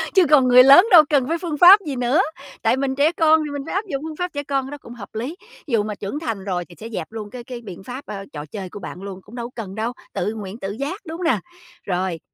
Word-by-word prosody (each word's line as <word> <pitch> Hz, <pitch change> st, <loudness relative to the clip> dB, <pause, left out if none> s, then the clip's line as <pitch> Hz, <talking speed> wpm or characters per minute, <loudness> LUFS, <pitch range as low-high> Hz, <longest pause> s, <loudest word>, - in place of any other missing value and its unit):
Chứ 375 Hz, -, +6 dB
còn 275 Hz, -4 st, +6 dB
người 250 Hz, 0 st, +8 dB
lớn 280 Hz, +9 st, +8 dB
đâu 330 Hz, -4 st, +10 dB
cần 275 Hz, -4 st, +2 dB
phải 330 Hz, +2 st, 0 dB
phương 330 Hz, -4 st, -4 dB
pháp 370 Hz, +5 st, +9 dB
gì 275 Hz, -, -2 dB
nữa, 250 Hz, +8 st, +2 dB, 0.4 s
tại -, -, +2 dB
mình 265 Hz, 0 st, -1 dB
trẻ 290 Hz, +3 st, +3 dB
con 320 Hz, -2 st, +4 dB
thì 290 Hz, -, -5 dB
mình 285 Hz, -, -4 dB
phải -, -, -6 dB
áp 400 Hz, +3 st, -1 dB
dụng 280 Hz, -3 st, -4 dB
phương 310 Hz, -, -7 dB
pháp 360 Hz, +1 st, -3 dB
trẻ 285 Hz, -1 st, -3 dB
con, 275 Hz, -2 st, -1 dB
cái 270 Hz, -, -9 dB
đó 290 Hz, -, -6 dB
cũng 240 Hz, -4 st, -12 dB
hợp 215 Hz, -4 st, -10 dB
lý. 255 Hz, +10 st, -4 dB, 0.3 s
Thí -, -, -8 dB
dụ 215 Hz, -, +3 dB
mà 210 Hz, -1 st, -4 dB
trưởng 205 Hz, +10 st, -5 dB
thành 225 Hz, -12 st, -4 dB
rồi 180 Hz, -3 st, -2 dB
thì 175 Hz, -, -16 dB
sẽ 225 Hz, -, -8 dB
dẹp 185 Hz, -8 st, -5 dB
luôn 215 Hz, -2 st, -7 dB
cái 245 Hz, +1 st, -9 dB
cái 245 Hz, -1 st, -8 dB
biện 190 Hz, -5 st, -10 dB
pháp, 255 Hz, +6 st, -8 dB
ờ, 200 Hz, -2 st, -7 dB
trò 150 Hz, -1 st, -6 dB
chơi 190 Hz, +3 st, -7 dB
của 205 Hz, -, -9 dB
bạn 180 Hz, 0 st, -8 dB
luôn, 195 Hz, -1 st, -8 dB
cũng 220 Hz, +6 st, -14 dB
đâu 240 Hz, 0 st, -5 dB
cần 200 Hz, -5 st, -6 dB
đâu, 225 Hz, +3 st, -2 dB, 0.2 s
tự 210 Hz, -, -2 dB
nguyện 205 Hz, +1 st, -7 dB
tự 195 Hz, +1 st, -4 dB
giác, 280 Hz, -, -4 dB
đúng 325 Hz, 0 st, -6 dB
hông 360 Hz, -, -6 dB
nè? 325 Hz, -, +2 dB, 0.4 s
Rồi, 180 Hz, -2 st, -2 dB
250 Hz, 295 wpm, -21 LUFS, 205-295 Hz, 0.4 s, đâu